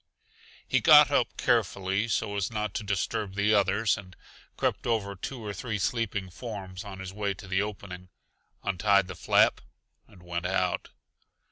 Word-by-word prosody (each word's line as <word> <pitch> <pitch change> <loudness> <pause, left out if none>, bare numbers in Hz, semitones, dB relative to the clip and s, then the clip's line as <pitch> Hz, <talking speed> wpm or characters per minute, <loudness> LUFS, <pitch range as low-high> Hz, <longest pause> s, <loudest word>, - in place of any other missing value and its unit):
He - - +2
got - - +8
up - - +1
carefully 95 +3 +1
so 105 -2 -1
as 100 +1 -1
not 105 -3 -2
to 110 - -3
disturb 100 0 -2
the 105 +1 +2
others, 100 +2 +2
and 90 -2 -13 0.4
crept - - -1
over 105 -4 0
two 115 +4 -6
or 105 - -4
three 110 +2 -3
sleeping 100 -3 -2
forms 95 -4 -7
on 100 -2 -8
his 95 0 -7
way 100 -1 -2
to 95 - -11
the 95 +1 +1
opening, 95 -3 -6 0.5
untied 100 0 +2
the 95 - -6
flap - - +3 0.5
and 90 - -18
went 85 0 -3
out. 90 -1 -1
100 Hz, 160 wpm, -28 LUFS, 95-105 Hz, 0.5 s, got